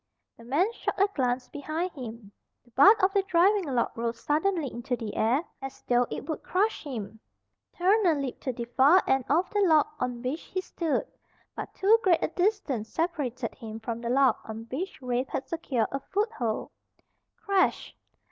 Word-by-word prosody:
The 230 - -15
man 340 - +1
shot - - -3
a 395 - +5
glance 250 -3 0
behind 310 +5 -3
him. 230 -7 -9 0.3
The 240 - -24
butt 395 - +6
of 380 +1 +4
the 400 - +4
driving 385 +1 +3
log 255 -5 -1
rose 230 0 -3
suddenly 315 +1 0
into 245 +2 -2
the 220 -3 -6
air 245 +8 +2 0.2
as 270 0 -8
though 245 0 +2
it - - -6
would 315 - -3
crush 415 +4 0
him. 220 -7 -6 0.6
Turner 370 -1 +4
leaped 275 -3 -4
to 260 - +1
the 235 -1 -5
far 275 +9 +5
end 265 -2 +2
of 335 +6 +3
the 415 - 0
log 320 -7 +5
on 245 -1 -3
which 270 +6 -2
he 370 - -4
stood. 335 -4 -2 0.5
But - - -7
too 430 +4 +4
great 355 -5 +3
a - - +1
distance 345 - -1
separated 285 -8 -2
him 220 -1 -8
from 230 +1 -5
the 235 - -3
log 265 +1 +4
on 220 +1 -7
which 350 +9 -4
Rafe 250 +1 -1
had 265 - -3
secured 275 -8 -1
a 275 - -2
foothold. 385 - -2 0.7
Crash! 395 -3 0
275 Hz, 180 wpm, -28 LUFS, 240-365 Hz, 0.7 s, butt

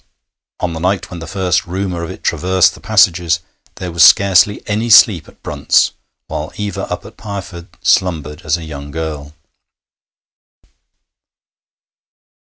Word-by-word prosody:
On 85 - -2
the 80 - -5
night 90 +2 -1
when 90 - -7
the 80 - -8
first 95 -1 -1
rumour 90 -1 -3
of 85 - -5
it - - -10
traversed 95 0 +2
the - - -14
passages 90 -6 +2 0.4
there 90 -1 -6
was 85 -1 -1
scarcely 100 +6 +5
any 110 +3 -2
sleep 100 -7 +6
at - - -23
Brunt's, - - +2 0.3
while 75 +3 -5
Eva 105 -1 -5
up - - -4
at - - -13
Pireford 95 -5 -7 0.2
slumbered 80 -4 0
as 80 0 0
a 85 - -8
young 70 -2 -8
girl. 75 -1 -6
90 Hz, 140 wpm, -16 LUFS, 80-95 Hz, 0.4 s, sleep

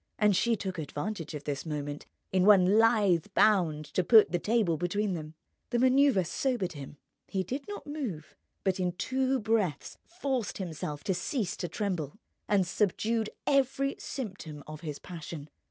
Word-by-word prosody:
And 210 -2 +4
she 235 +5 +2
took 190 -4 -4
advantage 160 +2 -4
of 145 - -6
this 145 -2 -3
moment 145 -2 -5 0.2
in 185 -1 +3
one 200 0 +6
lithe 210 -7 +4
bound 170 -8 +3
to 185 - +2
put 220 +3 +7
the 175 - +1
table 210 -4 +2
between 190 +5 -1
them. 155 -2 -6 0.3
The 240 - 0
manoeuvre 260 -5 +4
sobered 200 0 -1
him. 145 -2 -9 0.3
He 190 -1 -1
did 265 - -5
not 410 0 -7
move, 255 - -5 0.3
but 190 -1 +1
in 180 -1 0
two 260 +6 0
breaths 215 -7 -1 0.2
forced 260 - -1
himself 155 -5 -5
to 190 - 0
cease 185 - -2
to 175 - -3
tremble, 175 -4 -3 0.3
and 200 -3 +3
subdued 215 +4 0 0.2
every 275 0 +2
symptom 185 - -6
of 155 0 -9
his 150 -4 -5
passion. 160 -3 -8
190 Hz, 160 wpm, -30 LUFS, 160-225 Hz, 0.3 s, put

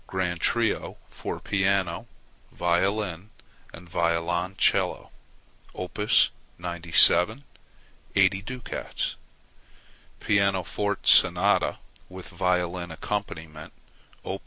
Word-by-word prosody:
Grand 90 -2 -3
Trio 120 -1 0
for - - -6
piano, 95 -3 -1 0.4
violin, 95 +2 -1 0.4
and 85 +1 -13
violoncello 85 +2 0 0.6
[Op. 90 +3 -7 0.6
97], 85 +6 +4 0.7
80 95 0 +3
ducats. 125 +3 -5 1.1
Pianoforte 100 0 0
Sonata, - - +4 0.3
with 95 -1 -10
violin 90 -1 -1
accompaniment 80 -3 -6 0.5
[Op. 95 +1 -5
90 Hz, 70 wpm, -26 LUFS, 85-100 Hz, 1.1 s, 97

